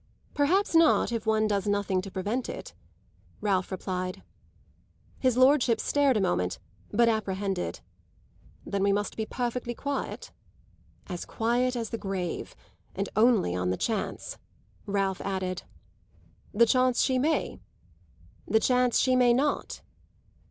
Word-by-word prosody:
"Perhaps 345 +9 +2
not 325 -6 +4
if 230 -2 -3
one 220 0 +3
does 205 -2 0
nothing 200 -2 +1
to 195 - -8
prevent 205 +7 -3
it," - - -7 0.7
Ralph 195 -3 0
replied. 185 -1 -4 1.0
His 255 -2 +2
lordship 255 -3 +4
stared 280 -4 +2
a - - +1
moment, 90 - 0 0.3
but 235 +2 +3
apprehended. 195 -4 -1 0.8
"Then 200 -1 -2
we 200 0 +3
must 205 +1 -1
be 220 -1 -3
perfectly 240 0 -3
quiet?" 280 +2 -4 0.7
"As 180 -2 -5
quiet 245 +3 0
as 230 -2 -3
the 230 - -3
grave. 190 -3 -4 0.4
And 195 +1 -2
only 215 - +3
on 90 0 -1
the 95 - -1
chance!" 225 -2 -3 0.5
Ralph 195 -2 0
added. 185 -2 -3 0.9
"The 235 +3 +5
chance 255 +1 +3
she 260 -1 +1
may?" 305 +3 0 0.9
"The 220 - +3
chance 250 +1 +2
she 255 0 +3
may 245 -1 +5
not?" 285 +3 -1
220 Hz, 130 wpm, -28 LUFS, 195-250 Hz, 1.0 s, The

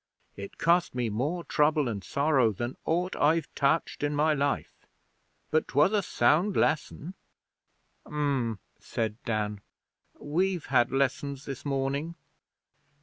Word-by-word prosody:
It 100 0 -9
cost 170 -3 +2
me 120 -3 -1
more 145 +11 -2
trouble 150 -3 +2
and 105 -4 -4
sorrow 140 -4 +2
than 120 +5 -4
aught 175 +3 0
I've 160 +3 +2
touched 140 +3 0
in 145 0 0
my 155 +1 +3
life. 140 -1 -2 0.6
But 155 - +2
'twas 145 +10 +3
a 210 - +3
sound 170 +6 +2
lesson.' 160 +3 0 0.9
'Um,' 140 -7 -1 0.2
said 110 -2 -3
Dan. 105 -2 -2 0.6
'We've 175 +3 -1
had 120 - +2
lessons 140 +1 -1
this 135 -2 -6
morning.' 140 +4 -2
145 Hz, 125 wpm, -28 LUFS, 125-160 Hz, 0.9 s, my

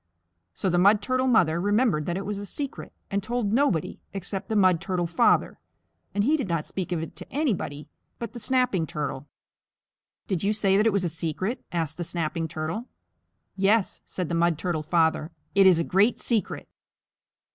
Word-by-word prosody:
So - - -2
the 175 -1 +2
Mud 200 +3 +6
Turtle 255 +5 0
Mother 175 -9 +3
remembered 205 - +2
that 175 +1 -1
it 195 - -4
was 205 -1 -3
a 205 - -6
secret, 280 +4 -4 0.2
and 200 0 0
told 235 -1 -1
nobody 230 - +1
except 195 +1 -4
the 220 - 0
Mud 185 -5 +4
Turtle 180 -2 -1
Father, 170 0 +2 0.6
and 205 - +2
he 290 +8 +3
did 275 -9 -2
not 165 -3 -1
speak 185 -1 -5
of 165 -2 -1
it - - -8
to - - -11
anybody 195 - -2 0.3
but 235 0 -6
the 240 - -7
Snapping 250 -9 +1
Turtle. 145 -2 -4 1.0
"Did 185 -3 -2
you 205 +2 +2
say 200 -3 +2
that 210 +3 +4
it - - +4
was 200 -2 0
a - - +1
secret?" 170 - -3
asked 160 -3 -2
the 175 - -3
Snapping 165 -1 -2
Turtle. 160 +10 -4 0.7
"Yes," 200 +2 +2
said 180 -3 -4
the 170 - -4
Mud 170 -1 +2
Turtle 165 -1 -2
Father, 160 -1 +1 0.2
"It 195 -1 +6
is 180 -3 +6
a 165 - +1
great 200 +8 +2
secret." 225 -4 -1
190 Hz, 190 wpm, -26 LUFS, 165-215 Hz, 1.0 s, Mud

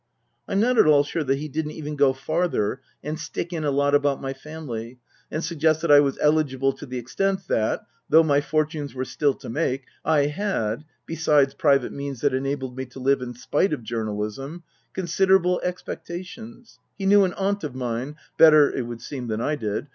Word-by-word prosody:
I'm 195 - 0
not 240 +2 +3
at - - +6
all 145 -2 +6
sure 155 +2 -2
that 135 +1 +1
he 150 +2 -5
didn't 150 +1 -3
even 150 -1 -5
go 140 -2 +4
farther 135 -4 -1 0.2
and 155 +2 -4
stick 170 +2 -5
in 160 -2 -3
a 150 - +1
lot 140 +1 +1
about 145 -1 +2
my 135 0 -4
family, 135 -5 -7 0.3
and 155 - -3
suggest 160 -1 +1
that 165 - +2
I 145 - +9
was 140 -2 +1
eligible 140 -3 +2
to 145 - -10
the 125 0 -5
extent 190 +11 -1
that, 110 -1 +1 0.3
though 160 +1 +7
my 145 -2 +3
fortunes 150 -1 -2
were 130 0 -2
still 145 0 0
to - - -11
make, 135 -1 -1 0.2
I 150 -3 +3
had 150 - -2 0.2
(besides 150 -4 +2
private 140 -3 +2
means 140 -3 -5
that 145 -2 +2
enabled 130 -1 -2
me 130 0 -5
to 130 +1 -12
live 135 +1 +2
in 125 -1 -6
spite 145 +8 0
of 140 - -4
journalism) 110 +8 -4 0.3
considerable 185 0 +2
expectations 185 +6 -7 0.2
(he 195 - -4
knew 200 +1 +6
an 185 -2 0
aunt 200 0 -1
of 145 -4 -5
mine 125 +3 -3 0.2
better, 155 -3 +7
it 125 -3 -2
would 120 -1 -7
seem, 130 -4 -6
than 110 -1 -2
I 150 +6 0
did). 110 -1 -3
145 Hz, 195 wpm, -24 LUFS, 130-160 Hz, 0.3 s, I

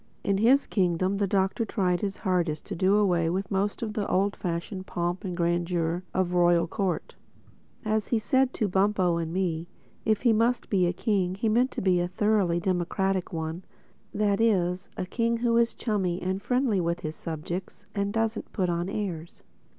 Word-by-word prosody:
In 195 -1 +1
his 260 +6 +5
kingdom 185 0 +1
the 200 0 +1
Doctor 195 +4 +1
tried 185 -6 0
his 200 -2 -2
hardest 175 -6 -1
to - - -5
do 190 +3 +3
away 175 -5 +2
with 190 +3 -2
most 200 +3 -1
of 215 -2 -3
the 210 -2 -2
old 200 +2 +1
fashioned 180 +2 -4
pomp 175 +3 -2
and 180 -3 -4
grandeur 170 0 0
of 185 -1 0
a - - -1
royal 175 -1 +4
court. 180 -2 -2 0.7
As 215 0 0
he 235 - +1
said 260 +5 +2
to 215 - +1
Bumpo 190 -2 +2
and 165 -1 -3
me, 170 -2 -1 0.4
if 215 0 +1
he 235 -3 +5
must 235 +2 +1
be 185 -3 +3
a - - +2
king 185 -1 0
he 210 +4 -1
meant 240 +4 +3
to - - -4
be 185 -2 +3
a 175 - 0
thoroughly 190 -2 +1
democratic 185 +1 -1
one, 160 +2 -4 0.5
that 205 0 +1
is 185 -5 +1
a - - -2
king 230 +4 0
who 235 0 +1
is 235 0 +2
chummy 190 -6 -1
and 190 +1 -2
friendly 245 -6 +1
with 170 +1 -1
his 155 0 -4
subjects 170 +3 -6
and 200 0 -1
doesn't 225 0 -2
put 185 -3 0
on 175 +2 -2
airs. 180 -5 -5
190 Hz, 190 wpm, -27 LUFS, 175-210 Hz, 0.7 s, his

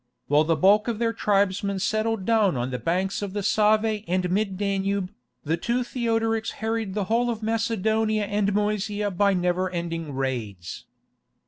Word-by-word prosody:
While 150 +2 +3
the 165 +1 +2
bulk 200 +8 +4
of 235 -2 -1
their 230 0 0
tribesmen 200 -2 +1
settled 215 +1 -1
down 215 - +3
on 125 +2 -2
the 125 - -3
banks 185 - -1
of 200 -2 -4
the 205 -1 -2
Save 215 +1 +2
and 180 0 0
Mid 195 -1 0
Danube, 195 -1 -1 0.3
the 160 +3 0
two 235 +7 -1
Theodorics 225 -2 -1
harried 220 -3 -3
the 210 - 0
whole 235 +5 +1
of 225 -2 -3
Macedonia 220 -1 0
and 205 0 0
Moesia 210 0 -1
by 200 +1 +2
never 180 +1 0
ending 165 -4 -4
raids. 110 -10 -4
205 Hz, 160 wpm, -25 LUFS, 180-220 Hz, 0.3 s, bulk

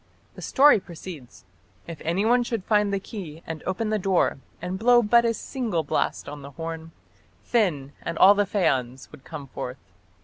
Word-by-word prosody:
The - - -11
story 285 -4 +5
proceeds: 165 -7 -11 0.4
"If 165 -3 -9
anyone 210 +9 +2
should 230 -4 -3
find 210 -1 +2
the 200 - 0
key 175 -6 -8
and 160 -2 -6
open 215 +3 -1
the 215 - +1
door, 185 -7 +1 0.2
and 185 +1 -4
blow 240 +2 +5
but 235 +2 +4
a 230 - +2
single 220 - -2
blast 145 - -1
on 145 0 -7
the 140 - -9
horn, 165 +2 -7 0.5
Finn 155 - 0
and 170 -1 -4
all 195 +2 +8
the 205 -1 +1
Feans 130 - -1
would 135 - -14
come 150 -4 -8
forth. 125 -1 -6
185 Hz, 175 wpm, -25 LUFS, 155-215 Hz, 0.5 s, all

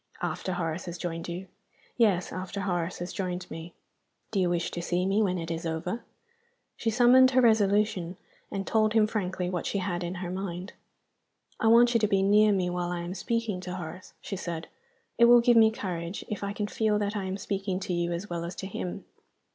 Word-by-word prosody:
"After 185 - -2
Horace 165 -1 -3
has 175 -1 -6
joined 165 0 -4
you?" 175 +2 -5 0.5
"Yes. 200 -7 +2
After 185 +2 -4
Horace 175 -2 -1
has 175 +1 -5
joined 180 -1 -3
me." 165 +1 -8 0.6
"Do 205 - 0
you 180 -2 +2
wish 175 -1 -1
to 175 - -4
see 175 +1 0
me 195 +3 +2
when 185 -3 +1
it 165 -1 -4
is 165 0 -3
over?" 170 +7 -3 0.7
She 225 - -1
summoned 250 +3 +6
her 260 0 +3
resolution, 205 -5 +2 0.3
and 195 -1 -3
told 215 -1 +2
him 220 -2 +5
frankly 185 -4 -2
what 180 -1 -2
she - - -1
had 180 -2 -2
in 175 +2 -4
her 175 -1 -4
mind. 185 0 -5 0.9
"I 225 - +2
want 235 +2 +6
you 230 - +4
to 210 - +2
be 195 -1 +2
near 210 +2 +5
me 185 -3 +1
while 175 0 -2
I 175 -1 -3
am 175 +1 -5
speaking 225 -2 -2
to 180 0 -5
Horace," 175 +1 -8
she 195 - -5
said. 170 -3 -5 0.5
"It 235 - +8
will 240 0 +8
give 240 0 +4
me 220 -1 +7
courage 180 -4 -5
if 210 - -4
I 200 - -2
can 205 0 -2
feel 210 0 +1
that 205 0 -1
I 200 -2 -2
am 190 +1 -3
speaking 195 -1 -2
to 185 - -3
you 175 0 0
as 170 +4 -3
well 170 -2 -4
as 170 +2 -5
to - - -6
him. 95 - -5
185 Hz, 215 wpm, -28 LUFS, 175-210 Hz, 0.9 s, It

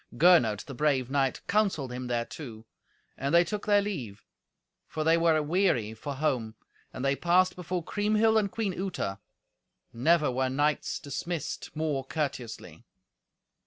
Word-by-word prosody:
Gernot, 125 - +5
the 140 - -8
brave 135 -2 0
knight, 135 -2 +1
counselled 190 -11 0
him 125 0 -5
thereto. 120 -1 -5 0.5
And 140 +5 0
they 170 - +7
took 210 +4 -5
their 205 -1 +4
leave, 130 - -5 0.6
for 155 - -3
they 160 +1 +4
were 165 -1 +3
aweary 150 - +1
for 140 +6 -6
home. 125 -6 -1 0.4
And 130 - -5
they 135 0 +2
passed 180 +4 +3
before 180 0 -3
Kriemhild 215 +3 +2
and 200 -2 -1
Queen 215 -4 -2
Uta; 180 - -3 0.7
never 150 +4 +3
were 130 +1 0
knights 145 +3 0
dismissed 155 +3 -5
more 150 -3 -1
courteously. 135 -5 -5
150 Hz, 140 wpm, -28 LUFS, 130-180 Hz, 0.7 s, they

